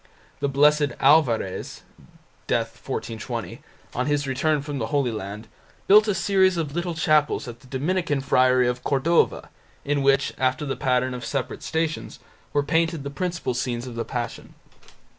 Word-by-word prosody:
The 140 Hz, -, 0 dB
Blessed 145 Hz, 0 st, +3 dB
Alvarez 135 Hz, -9 st, +2 dB, 0.6 s
(d. -, -, +2 dB
1420), 115 Hz, -2 st, -4 dB, 0.3 s
on 125 Hz, +2 st, -1 dB
his 145 Hz, -1 st, +1 dB
return 140 Hz, +2 st, 0 dB
from 145 Hz, -2 st, -4 dB
the 110 Hz, -, -2 dB
Holy 135 Hz, -1 st, 0 dB
Land, 105 Hz, +1 st, -6 dB, 0.4 s
built 210 Hz, +2 st, +6 dB
a 205 Hz, -, +1 dB
series 190 Hz, -1 st, +3 dB
of 150 Hz, -4 st, -2 dB
little 175 Hz, 0 st, -2 dB
chapels 155 Hz, -4 st, +2 dB
at 120 Hz, -1 st, -8 dB
the 130 Hz, -, -18 dB
Dominican 150 Hz, +3 st, -1 dB
friary 130 Hz, -2 st, +3 dB
of 125 Hz, 0 st, -2 dB
Cordova, 150 Hz, +5 st, +1 dB, 0.4 s
in 145 Hz, 0 st, 0 dB
which, 135 Hz, 0 st, +2 dB
after 130 Hz, +2 st, 0 dB
the 135 Hz, -, -2 dB
pattern 130 Hz, -1 st, 0 dB
of 125 Hz, -1 st, -6 dB
separate 125 Hz, +2 st, -3 dB
Stations, 160 Hz, -1 st, -2 dB, 0.3 s
were 145 Hz, -, +1 dB
painted 165 Hz, 0 st, 0 dB
the 140 Hz, -, -5 dB
principal 175 Hz, -3 st, -2 dB
scenes 120 Hz, -1 st, -2 dB
of 125 Hz, -, -7 dB
the 115 Hz, 0 st, -3 dB
Passion. 120 Hz, -2 st, -5 dB
140 Hz, 160 wpm, -24 LUFS, 125-155 Hz, 0.6 s, built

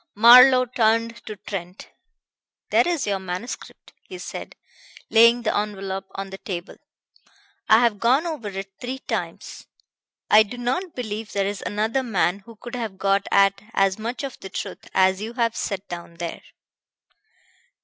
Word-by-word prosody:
Marlowe 250 Hz, +4 st, +8 dB
turned 230 Hz, -1 st, +1 dB
to 215 Hz, -, -5 dB
Trent. 185 Hz, -2 st, -7 dB, 0.8 s
"There -, -, +4 dB
is 340 Hz, -5 st, 0 dB
your 200 Hz, -1 st, -1 dB
manuscript," 190 Hz, +6 st, -7 dB
he 370 Hz, -, -10 dB
said, -, -, -8 dB, 0.6 s
laying 235 Hz, +1 st, +6 dB
the 215 Hz, -, 0 dB
envelop 195 Hz, -2 st, -3 dB
on 195 Hz, 0 st, -5 dB
the 195 Hz, -, -8 dB
table. 180 Hz, -2 st, -6 dB, 0.9 s
"I 220 Hz, +2 st, +7 dB
have 230 Hz, -4 st, +2 dB
gone 260 Hz, +7 st, +3 dB
over 310 Hz, -10 st, -4 dB
it 195 Hz, 0 st, -6 dB
three 255 Hz, +2 st, -4 dB
times. -, -, -5 dB, 0.6 s
I 215 Hz, -, +7 dB
do 220 Hz, +3 st, -3 dB
not 265 Hz, +9 st, -2 dB
believe 220 Hz, -3 st, -5 dB
there 200 Hz, -1 st, 0 dB
is 200 Hz, 0 st, -3 dB
another 220 Hz, +5 st, -1 dB
man 195 Hz, -6 st, 0 dB
who 230 Hz, +3 st, -15 dB
could 240 Hz, +3 st, -11 dB
have 225 Hz, -6 st, -4 dB
got 195 Hz, +1 st, +1 dB
at 195 Hz, 0 st, +3 dB
as 195 Hz, +1 st, +2 dB
much 235 Hz, +5 st, -4 dB
of 275 Hz, -2 st, -6 dB
the 190 Hz, -, -9 dB
truth -, -, -7 dB
as 190 Hz, +1 st, +3 dB
you 225 Hz, +2 st, -5 dB
have 230 Hz, -2 st, 0 dB
set 200 Hz, -1 st, -4 dB
down 170 Hz, -1 st, -8 dB
there." 170 Hz, 0 st, -6 dB
215 Hz, 160 wpm, -23 LUFS, 195-240 Hz, 0.9 s, Marlowe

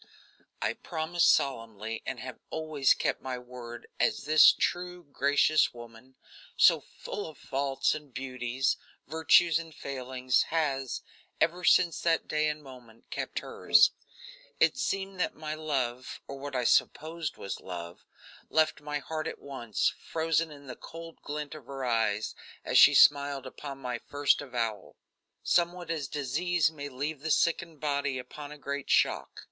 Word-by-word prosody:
I -, -, +1 dB
promised 170 Hz, +1 st, +1 dB
solemnly 115 Hz, -4 st, -1 dB
and 120 Hz, -, -3 dB
have 130 Hz, -1 st, -8 dB
always 155 Hz, -4 st, +2 dB
kept -, -, -1 dB
my 130 Hz, -1 st, -4 dB
word, 125 Hz, -1 st, -9 dB
as -, -, +1 dB
this 155 Hz, +2 st, +8 dB
true, 180 Hz, 0 st, -2 dB
gracious 145 Hz, 0 st, +2 dB
woman, 120 Hz, +2 st, -13 dB, 0.4 s
so -, -, +7 dB
full 205 Hz, -, -7 dB
of 155 Hz, -, -11 dB
faults 135 Hz, 0 st, 0 dB
and 150 Hz, -2 st, -8 dB
beauties, 130 Hz, 0 st, -1 dB, 0.3 s
virtues 160 Hz, +1 st, +4 dB
and 165 Hz, -1 st, -10 dB
failings, 130 Hz, -1 st, -1 dB
has, 140 Hz, -5 st, -1 dB, 0.4 s
ever 175 Hz, +2 st, +1 dB
since 175 Hz, -2 st, +4 dB
that 165 Hz, -1 st, +1 dB
day 155 Hz, 0 st, +1 dB
and 150 Hz, 0 st, -5 dB
moment, 125 Hz, -4 st, -15 dB
kept -, -, -3 dB
hers. -, -, +4 dB, 0.7 s
It -, -, +4 dB
seemed 195 Hz, -7 st, -2 dB
that -, -, 0 dB
my 155 Hz, 0 st, -5 dB
love, 130 Hz, -5 st, -3 dB
or 140 Hz, -, -6 dB
what 140 Hz, 0 st, -6 dB
I 125 Hz, -, +1 dB
supposed 160 Hz, +6 st, +1 dB
was 100 Hz, -, -5 dB
love, 85 Hz, -2 st, -8 dB, 0.5 s
left 155 Hz, -1 st, +2 dB
my 150 Hz, 0 st, -3 dB
heart 155 Hz, +2 st, -4 dB
at -, -, -5 dB
once, 120 Hz, -6 st, -1 dB
frozen 165 Hz, 0 st, 0 dB
in 145 Hz, -2 st, -12 dB
the 130 Hz, -2 st, -7 dB
cold 165 Hz, 0 st, -10 dB
glint 150 Hz, 0 st, -5 dB
of 150 Hz, -5 st, -11 dB
her 135 Hz, -1 st, -5 dB
eyes 110 Hz, -3 st, 0 dB, 0.3 s
as -, -, +4 dB
she -, -, +8 dB
smiled 140 Hz, -1 st, +5 dB
upon 135 Hz, +1 st, -7 dB
my 125 Hz, -3 st, -4 dB
first 145 Hz, +3 st, +1 dB
avowal; 115 Hz, -7 st, -3 dB, 0.5 s
somewhat 175 Hz, 0 st, +1 dB
as 150 Hz, -4 st, -2 dB
disease 155 Hz, +4 st, 0 dB
may 145 Hz, -2 st, -7 dB
leave 145 Hz, +3 st, -4 dB
the 160 Hz, +3 st, -4 dB
sickened 165 Hz, 0 st, +1 dB
body 140 Hz, -2 st, -1 dB
upon 145 Hz, +4 st, -8 dB
a 150 Hz, -, -9 dB
great 140 Hz, -1 st, -5 dB
shock. -, -, +2 dB
145 Hz, 150 wpm, -29 LUFS, 130-160 Hz, 0.7 s, this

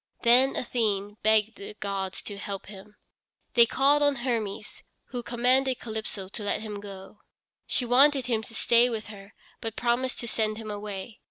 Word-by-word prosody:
Then 250 Hz, +3 st, +5 dB
Athene 210 Hz, -4 st, -1 dB
begged 220 Hz, 0 st, +3 dB
the 200 Hz, -, -8 dB
gods 195 Hz, -2 st, -4 dB
to 205 Hz, -1 st, -7 dB
help 200 Hz, -1 st, -5 dB
him. 205 Hz, +1 st, -12 dB, 0.6 s
They 235 Hz, -1 st, +7 dB
called 280 Hz, +4 st, +3 dB
on 285 Hz, -1 st, +3 dB
Hermes, 235 Hz, -5 st, -3 dB, 0.3 s
who 245 Hz, -, -4 dB
commanded 255 Hz, +2 st, +2 dB
Calypso 220 Hz, -4 st, -5 dB
to 205 Hz, +2 st, -7 dB
let 205 Hz, -, 0 dB
him 210 Hz, -2 st, -5 dB
go. 200 Hz, 0 st, -10 dB, 0.5 s
She 250 Hz, -, 0 dB
wanted 270 Hz, +2 st, +5 dB
him 230 Hz, -3 st, 0 dB
to 225 Hz, +1 st, -11 dB
stay 240 Hz, +2 st, +4 dB
with 220 Hz, -2 st, -4 dB
her 200 Hz, -1 st, -12 dB, 0.2 s
but 225 Hz, -1 st, -5 dB
promised 245 Hz, +2 st, 0 dB
to 235 Hz, -, -5 dB
send 215 Hz, -1 st, 0 dB
him 220 Hz, -1 st, -6 dB
away. 205 Hz, +1 st, -6 dB
220 Hz, 170 wpm, -27 LUFS, 205-245 Hz, 0.6 s, They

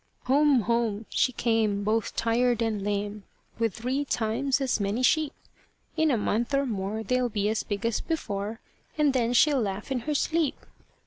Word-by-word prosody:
Home, 280 Hz, -1 st, +4 dB
home 230 Hz, -1 st, 0 dB
she 255 Hz, -, +2 dB
came, 220 Hz, -4 st, +1 dB
both 220 Hz, +1 st, 0 dB
tired 235 Hz, 0 st, +1 dB
and 220 Hz, -3 st, -1 dB
lame, 205 Hz, 0 st, -3 dB, 0.4 s
With 225 Hz, -4 st, 0 dB
three 255 Hz, +5 st, -1 dB
times 260 Hz, +2 st, 0 dB
as 265 Hz, -4 st, 0 dB
many 205 Hz, +5 st, -1 dB
sheep. 310 Hz, +3 st, +3 dB, 0.6 s
In 315 Hz, 0 st, +2 dB
a 255 Hz, -, +2 dB
month 230 Hz, +6 st, 0 dB
or 275 Hz, 0 st, +2 dB
more, 215 Hz, -1 st, -3 dB
they'll 250 Hz, +2 st, +1 dB
be 205 Hz, -2 st, -1 dB
as 220 Hz, -, 0 dB
big 205 Hz, +1 st, -4 dB
as 230 Hz, -1 st, 0 dB
before, 220 Hz, -8 st, -3 dB, 0.4 s
And 295 Hz, -3 st, +3 dB
then 240 Hz, -2 st, +1 dB
she'll 280 Hz, +1 st, +4 dB
laugh 205 Hz, +4 st, -4 dB
in 260 Hz, -, 0 dB
her 300 Hz, -, 0 dB
sleep. 320 Hz, 0 st, +1 dB
230 Hz, 175 wpm, -27 LUFS, 210-265 Hz, 0.6 s, Home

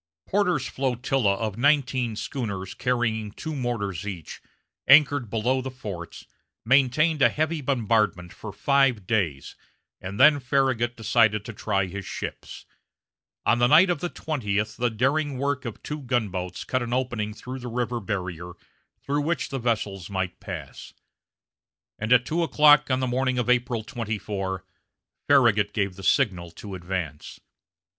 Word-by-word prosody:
Porter's 180 Hz, -9 st, +1 dB
flotilla 125 Hz, -5 st, 0 dB
of 110 Hz, 0 st, -4 dB
nineteen 130 Hz, -4 st, +2 dB
schooners 100 Hz, -7 st, -4 dB
carrying 110 Hz, -4 st, -1 dB
two 155 Hz, +9 st, -6 dB
mortars 105 Hz, -, -3 dB
each, 90 Hz, -7 st, -7 dB, 0.5 s
anchored 140 Hz, -3 st, +6 dB
below 120 Hz, +5 st, 0 dB
the 130 Hz, -, -5 dB
forts, 100 Hz, -9 st, -8 dB, 0.4 s
maintained 140 Hz, +5 st, +3 dB
a -, -, +7 dB
heavy 155 Hz, +1 st, -1 dB
bombardment 110 Hz, -9 st, 0 dB
for 105 Hz, -, -8 dB
five 135 Hz, -2 st, +2 dB
days, 90 Hz, -11 st, -1 dB, 0.5 s
and 95 Hz, +2 st, -6 dB
then 145 Hz, +2 st, +7 dB
Farragut 130 Hz, -3 st, 0 dB
decided 110 Hz, -2 st, +2 dB
to 115 Hz, -, -7 dB
try 100 Hz, -2 st, 0 dB
his 100 Hz, +2 st, -6 dB
ships. -, -, -7 dB, 0.8 s
On 120 Hz, -, +3 dB
the 120 Hz, -, +5 dB
night 170 Hz, +7 st, +6 dB
of 170 Hz, -, -1 dB
the 175 Hz, -, -3 dB
twentieth 105 Hz, -11 st, -2 dB
the 120 Hz, 0 st, 0 dB
daring 135 Hz, +5 st, 0 dB
work 140 Hz, 0 st, -1 dB
of 115 Hz, -, -7 dB
two 150 Hz, 0 st, -4 dB
gunboats 100 Hz, -9 st, -2 dB
cut 130 Hz, -, -1 dB
an 120 Hz, 0 st, -3 dB
opening 120 Hz, -5 st, -1 dB
through 130 Hz, +3 st, -7 dB
the 125 Hz, -, -7 dB
river 120 Hz, 0 st, -2 dB
barrier 90 Hz, -4 st, -4 dB, 0.5 s
through 145 Hz, +1 st, 0 dB
which 160 Hz, +2 st, -1 dB
the 135 Hz, -, -3 dB
vessels 105 Hz, -6 st, -2 dB
might 95 Hz, -2 st, -3 dB
pass; -, -, -8 dB, 1.1 s
and 110 Hz, +2 st, -3 dB
at 125 Hz, 0 st, +6 dB
two 170 Hz, +2 st, -1 dB
o'clock 150 Hz, -3 st, +5 dB
on 130 Hz, 0 st, +1 dB
the -, -, +1 dB
morning 130 Hz, +1 st, 0 dB
of 125 Hz, -, 0 dB
April 120 Hz, -2 st, +1 dB
24, 100 Hz, -6 st, -4 dB, 0.6 s
Farragut 115 Hz, -7 st, +4 dB
gave 100 Hz, -3 st, -1 dB
the 95 Hz, -, -10 dB
signal 95 Hz, -7 st, +1 dB
to 100 Hz, +4 st, -10 dB
advance. 85 Hz, -5 st, -5 dB
120 Hz, 150 wpm, -25 LUFS, 100-135 Hz, 1.1 s, a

